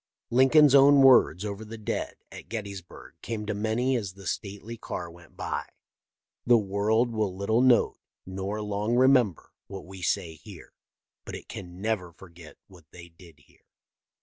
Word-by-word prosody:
Lincoln's 135 +3 +5
own 140 0 +7
words 115 -8 +5
over 105 +1 -5
the 110 +1 -9
dead 110 - -4 0.2
at - - -11
Gettysburg 100 -5 -8
came 110 -2 -5
to 105 - -2
many 110 +5 0
as 100 -6 -3
the 95 0 -14
stately 100 +4 -5
car 85 -6 -6
went 85 +1 -18
by: - - -3 0.4
" - - -65
The 120 -1 +6
world 110 +3 0
will 105 -4 -2
little 110 +4 +1
note 130 -2 +3 0.3
nor 95 +3 -4
long 105 +3 -1
remember 125 - +3 0.2
what 95 -1 -9
we 95 0 -11
say 90 -2 -1
here, 80 - -14 0.5
but - - -8
it - - -10
can 90 0 -9
never 100 -6 -2
forget 85 -3 -15
what 90 -5 -18
they 85 0 -13
did 85 0 -18
here." - - -29
105 Hz, 165 wpm, -27 LUFS, 95-115 Hz, 0.5 s, own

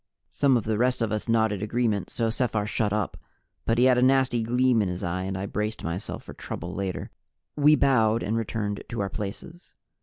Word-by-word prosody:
Some 135 -3 +3
of 115 - -2
the 110 -1 -1
rest 125 0 +2
of 110 - -1
us 110 +2 -2
nodded 110 -3 +2
agreement, 110 -2 0
so 115 -1 -1
Sephar 110 -3 0
shut 110 -1 0
up. 105 -2 -1 0.5
But 115 - +1
he 120 - +4
had 125 -1 +5
a - - +2
nasty 130 -2 +3
gleam 125 +1 +2
in 100 - 0
his 90 +2 -4
eye 90 +1 -2
and 95 0 -3
I 95 - -3
braced 105 +2 -3
myself 85 +4 -4
for - - -10
trouble 90 +2 -6
later. 95 -2 -4 0.4
We 150 +1 +6
bowed 115 -6 +3
and 110 - -1
returned 105 -2 -2
to 115 - -4
our 100 - -1
places. 110 - -7
110 Hz, 210 wpm, -26 LUFS, 105-125 Hz, 0.5 s, We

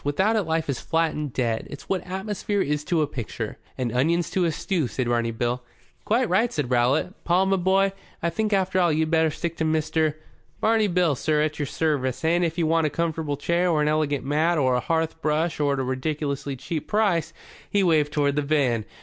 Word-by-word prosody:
Without 190 +10 +1
it 220 - +3
life 160 -2 -1
is 140 -3 -2
flat 165 -1 +1
and 150 -2 -4
dead. 115 -3 -1
It's 145 - -10
what 190 -2 0
atmosphere 205 +2 -2
is 150 -4 0
to 165 -2 +2
a - - +2
picture." 115 -4 -5 0.2
"And 125 -3 -1
onions 165 +7 +1
to 185 -2 +1
a 165 - +1
stew," 160 -2 -1
said 125 0 -2
Barney 120 -1 +1
Bill. 120 +2 -2 0.4
"Quite 240 +3 +2
right," 220 +6 +2
said 145 -5 -2
Rowlatt. 125 - +1
"Paul, 180 +2 +3
my 195 0 +2
boy, 190 +2 +2 0.3
I 170 - +1
think 215 +2 -1
after 190 -2 +1
all 175 -2 +3
you'd 155 +1 0
better 160 -1 +3
stick 165 +2 -4
to - - -1
Mr. 155 -1 +1 0.2
?" - - -37
"Barney 220 -1 +3
Bill, 175 -4 +2
sir, 150 +3 +1
at 155 -1 -2
your 145 - -1
service. 145 -3 -1
And, 170 +2 +3
if 165 0 -1
you 170 - +2
want 160 0 +2
a - - -1
comfortable 160 -2 -2
chair, 170 +5 +1
or 160 -3 +2
an - - +1
elegant 150 -3 0
mat, 155 +4 +2
or 130 -3 +2
a 125 - +2
hearth 160 +3 -1
brush 155 +2 0
at 140 -1 +1
a - - 0
ridiculous 140 +2 -2
cheap 155 +4 -4
price" 195 -7 +1 0.4
he 200 -1 +2
waved 155 -4 +3
toward 145 -2 +1
the 150 - +1
van. 140 -7 +1
155 Hz, 220 wpm, -24 LUFS, 145-175 Hz, 0.4 s, it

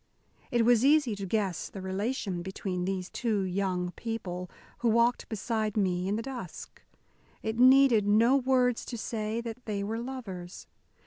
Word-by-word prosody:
It 235 -2 +2
was 240 -1 +5
easy 280 -5 +4
to 195 -1 -5
guess 190 -5 -1
the 195 - -8
relation 190 0 -2
between 185 -1 -3
these 185 -1 -2
two 215 -4 -1
young 185 -1 -1
people 180 -5 -5 0.3
who 235 - +2
walked 235 +2 +2
beside 220 0 -2
me 185 -2 +1
in 200 - 0
the 225 - -3
dusk. 245 -10 -8 0.6
It 220 +1 -2
needed 255 -4 +6
no 230 +5 +5
words 255 -2 +2
to 240 - -5
say 220 0 -3
that 235 +1 -7
they 200 -2 -2
were 220 +3 -3
lovers. 210 -8 -7
215 Hz, 155 wpm, -29 LUFS, 190-240 Hz, 0.6 s, needed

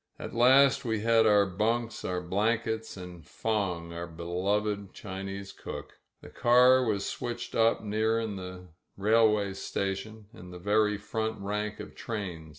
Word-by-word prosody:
At - - -7
last 130 +3 +5
we 110 -4 -1
had 115 0 +4
our 105 -1 +5
bunks, 110 +4 -1
our 90 -1 -2
blankets, 110 +4 -1
and 90 -2 -9
Fong, 90 -3 -2
our 85 0 -5
beloved 95 +4 -2
Chinese 95 0 -6
cook. - - -9 0.2
The - - -12
car 125 +2 +5
was 105 -4 0
switched 120 -1 -5
up 115 0 +3
near 110 +2 +1
in 110 -3 -3
the 90 -1 -8 0.3
railway 105 -1 +3
station 100 +3 -4
— - - -34
^in 90 -4 -11
the 90 - -9
very 105 +3 +2
front 110 +1 -3
rank 105 +1 -3
of - - -8
trains. 90 -8 -5
105 Hz, 155 wpm, -29 LUFS, 95-110 Hz, 0.3 s, last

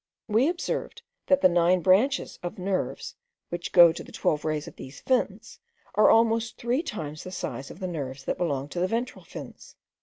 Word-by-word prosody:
We 230 +7 +3
observed, 405 +6 -4 0.2
that 280 0 +4
the - - +7
nine 175 +1 +3
branches 215 +10 +2
of 175 -1 -5
nerves, 190 0 -2 0.4
which 175 0 -5
go 175 -2 +8
to - - -7
the - - -14
twelve 150 - 0
rays 155 -1 -2
of - - -10
these 130 +1 -10
fins, 255 -1 -1 0.3
are 210 - +5
almost 230 0 +3
three 245 +5 0
times 155 - -6
the - - -7
size 140 -6 -5
of - - -11
the 190 - -4
nerves 135 -6 -5
that - - -3
belong 140 -5 -1
to 175 - -4
the 180 - +2
ventral 230 +5 -3
fins. - - -11
185 Hz, 190 wpm, -27 LUFS, 160-230 Hz, 0.4 s, go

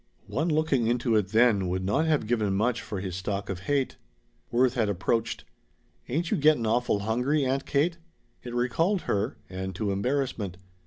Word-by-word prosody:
One 135 +11 -1
looking 150 -6 +2
into 120 -1 +1
it 105 -3 +2
then 110 -2 +3
would 95 +1 -2
not 140 +12 +1
have 150 -7 +2
given 105 -4 +1
much 115 +4 +1
for 100 - -5
his 95 -3 -4
stock 100 +1 -3
of 95 - -4
hate. 135 +7 -1 0.5
Worth 125 +1 +3
had 115 -5 +1
approached. 110 +4 -1 0.6
"Ain't 165 +7 -1
you - - +2
getting 150 -5 +4
awful 115 -2 +1
hungry, 125 +7 +1
Aunt 135 +1 -1
Kate?" 165 +4 +1 0.4
It 120 -1 -7
recalled 165 - +1
her, 105 +6 -1
and 95 0 -5
to 105 +1 -1
embarrassment. 110 -3 -1
120 Hz, 170 wpm, -27 LUFS, 100-140 Hz, 0.6 s, getting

